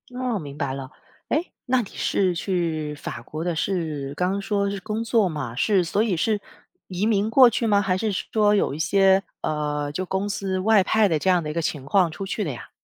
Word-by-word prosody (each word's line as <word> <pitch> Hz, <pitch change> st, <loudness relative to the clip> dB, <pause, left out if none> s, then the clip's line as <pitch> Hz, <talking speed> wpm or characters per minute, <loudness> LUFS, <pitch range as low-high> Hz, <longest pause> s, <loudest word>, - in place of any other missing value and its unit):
哦， 250 Hz, -5 st, -1 dB
明 145 Hz, -2 st, -8 dB
白 140 Hz, -3 st, -2 dB
了， 135 Hz, 0 st, -6 dB, 0.4 s
诶？ 320 Hz, +4 st, -1 dB
那 255 Hz, 0 st, +2 dB
你 205 Hz, -, -8 dB
是 185 Hz, -3 st, 0 dB
去 165 Hz, -4 st, -2 dB
法 145 Hz, -, -7 dB
国 155 Hz, +1 st, -6 dB
的 175 Hz, -1 st, -1 dB
是 155 Hz, -6 st, -2 dB
刚 185 Hz, +4 st, 0 dB
说 200 Hz, -1 st, 0 dB
是 200 Hz, -, -4 dB
工 215 Hz, +4 st, -3 dB
作 225 Hz, -3 st, +2 dB
嘛， 145 Hz, -8 st, -4 dB
是 190 Hz, -, +2 dB
所 200 Hz, +5 st, 0 dB
以 220 Hz, -5 st, +1 dB
是 210 Hz, +5 st, +1 dB, 0.5 s
移 185 Hz, +3 st, -2 dB
民 215 Hz, -1 st, +2 dB
过 250 Hz, +2 st, +7 dB
去 230 Hz, 0 st, -1 dB
吗？ 205 Hz, -1 st, +4 dB
还 185 Hz, -2 st, 0 dB
是 220 Hz, +3 st, -1 dB
说 210 Hz, +2 st, +2 dB
有 200 Hz, -, +1 dB
一 150 Hz, -, -6 dB
些， 195 Hz, +2 st, +4 dB, 0.2 s
呃， 150 Hz, -1 st, -2 dB
就 185 Hz, +6 st, -3 dB
公 190 Hz, +2 st, -2 dB
司 195 Hz, -2 st, -2 dB
外 215 Hz, +1 st, +4 dB
派 210 Hz, +2 st, +3 dB
的 160 Hz, -3 st, +1 dB
这 190 Hz, -, 0 dB
样 180 Hz, -3 st, +3 dB
的 150 Hz, -, -4 dB
一 -, -, -3 dB
个 170 Hz, -, -1 dB
情 145 Hz, -3 st, -3 dB
况 180 Hz, +4 st, +3 dB
出 160 Hz, +5 st, -6 dB
去 200 Hz, +2 st, -2 dB
的 150 Hz, -, -2 dB
呀？ 120 Hz, -, -9 dB
190 Hz, 245 characters per minute, -24 LUFS, 155-205 Hz, 0.5 s, 过